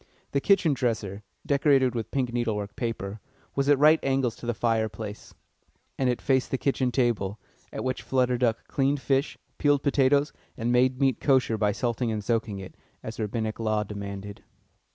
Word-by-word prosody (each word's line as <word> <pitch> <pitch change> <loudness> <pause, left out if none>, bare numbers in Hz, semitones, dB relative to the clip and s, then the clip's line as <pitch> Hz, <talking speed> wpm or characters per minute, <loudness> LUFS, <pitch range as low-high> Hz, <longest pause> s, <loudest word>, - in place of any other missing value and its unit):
The 140 - +1
kitchen 185 -5 +4
dresser, 110 -6 -2 0.2
decorated 140 -3 +3
with 115 -2 -3
pink 125 -3 -1
needle 120 -3 0
work 105 0 -5
paper, 110 -4 -4 0.3
was 140 +1 0
at 145 - +6
right 155 +3 +6
angles 135 -4 +1
to 120 - -8
the 120 - +1
fireplace, 110 -2 -2 0.6
and 130 -2 +1
it 125 - -2
faced 130 -1 +2
the 135 - 0
kitchen 130 -2 0
table, 115 -5 0 0.3
at - - -5
which 130 0 -2
Flutter 125 -2 +1
Duck 115 -3 0
cleaned 140 +1 +1
fish, 135 +3 0 0.2
peeled 145 -1 +3
potatoes, 140 +1 +3 0.2
and 115 +2 -1
made 125 +1 +3
meat 135 -4 +2
kosher 130 -5 +3
by 105 -1 +1
salting 120 +2 -1
and 105 -1 -3
soaking 110 -2 -1
it, 95 -1 -8 0.3
as 110 +1 -7
Rabbinic 110 0 -2
law 110 -1 +1
demanded. 100 -1 -7
120 Hz, 175 wpm, -27 LUFS, 110-135 Hz, 0.6 s, at